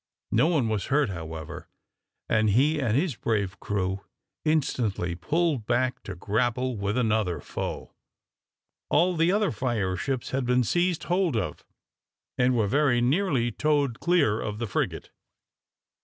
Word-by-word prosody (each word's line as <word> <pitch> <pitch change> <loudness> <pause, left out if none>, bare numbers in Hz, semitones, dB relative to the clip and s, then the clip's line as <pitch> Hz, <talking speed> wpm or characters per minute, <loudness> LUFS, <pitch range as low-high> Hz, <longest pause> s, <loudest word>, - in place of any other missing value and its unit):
No 120 +8 +4
one 155 -9 +2
was 110 -3 -1
hurt, 140 -3 +2
however, 80 -3 -7 0.6
and 110 -1 +2
he 145 +9 +3
and 120 -4 +1
his 155 -3 0
brave 100 -4 -1
crew 95 -1 -2 0.4
instantly 120 - 0
pulled 145 - 0
back 125 +1 0
to 100 - -6
grapple 120 +6 0
with 100 +2 -2
another 110 -7 +1
foe. - - -5 1.0
All 180 +1 +3
the 165 +2 +3
other 210 0 +2
fire 105 -5 -1
ships 125 +7 -3
had 135 0 0
been 125 +1 +2
seized 175 - 0
hold 175 -7 +1
of 100 - -3 0.7
and 125 0 +2
were 110 - +3
very 135 +2 +2
nearly 130 -2 +1
towed 145 -2 0
clear 155 -12 +2
of 105 -1 -4
the 115 - -2
frigate. 100 - -3
120 Hz, 140 wpm, -26 LUFS, 105-150 Hz, 1.0 s, No